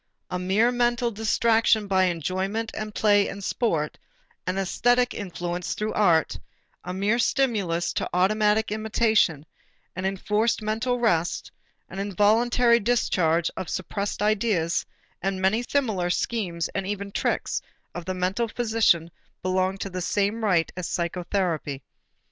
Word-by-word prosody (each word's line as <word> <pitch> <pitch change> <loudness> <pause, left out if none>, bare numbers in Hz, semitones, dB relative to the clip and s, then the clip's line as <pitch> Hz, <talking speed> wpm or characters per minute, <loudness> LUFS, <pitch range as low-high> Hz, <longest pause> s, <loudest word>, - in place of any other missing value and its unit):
A 180 - -2
mere 200 +6 +2
mental 240 0 +1
distraction 220 0 +2
by 190 -1 +3
enjoyment 185 +6 -2
and 215 -1 -5
play 205 -1 +4
and 200 0 -7
sport, 165 -10 -1 0.5
an 185 - 0
æsthetic 245 +6 +2
influence 175 -3 -4
through 215 +1 -2
art, 170 -7 +2 0.4
a 180 - -5
mere 200 +5 +1
stimulus 205 -10 +1
to - - -2
automatic 210 +4 +2
imitation, 215 -7 +1 0.5
an 185 +1 -4
enforced 210 +4 0
mental 225 +4 0
rest, 175 -8 0 0.4
an 190 - -8
involuntary 230 +4 +3
discharge 175 -8 +1
of 185 - -5
suppressed 200 +2 -3
ideas, 210 -6 +1 0.3
and 190 0 -1
many 190 +5 +2
similar 225 -9 0
schemes 175 -4 -1
and 195 -1 -3
even 200 0 -4
tricks - - -1 0.3
of 175 -1 -6
the 185 +1 -3
mental 190 +6 0
physician 220 -8 +1 0.3
belong 185 +1 0
with 195 - -7
the 185 - -3
same 205 +5 0
right 180 -6 +2
to 180 - -4
psychotherapy. 170 -5 -2
200 Hz, 130 wpm, -25 LUFS, 180-220 Hz, 0.5 s, play